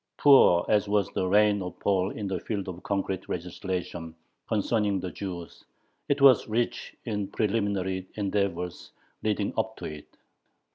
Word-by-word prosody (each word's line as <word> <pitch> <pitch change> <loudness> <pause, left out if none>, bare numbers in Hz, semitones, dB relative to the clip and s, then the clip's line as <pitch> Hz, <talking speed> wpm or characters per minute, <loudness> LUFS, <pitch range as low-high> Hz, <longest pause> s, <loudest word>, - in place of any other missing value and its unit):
Poor 135 -11 +6
as 105 -1 +2
was 100 -3 +2
the 95 - -1
reign 105 +1 +4
of 90 -1 -6
Paul 95 -1 +1
in 105 - -5
the 95 -2 -2
field 100 0 -4
of 90 -1 -6
concrete 95 -2 -2
legislation 90 -2 -4 0.3
concerning 105 -2 +1
the 90 -1 -5
Jews, 90 -4 -7 0.5
it 145 0 +2
was 135 -4 +7
rich 120 +2 -2
in 105 -4 -2
preliminary 100 -3 -1
endeavors 100 -4 -2 0.3
leading 105 -2 0
up 110 0 -2
to - - -7
it. 75 -1 -7
100 Hz, 145 wpm, -27 LUFS, 90-105 Hz, 0.5 s, was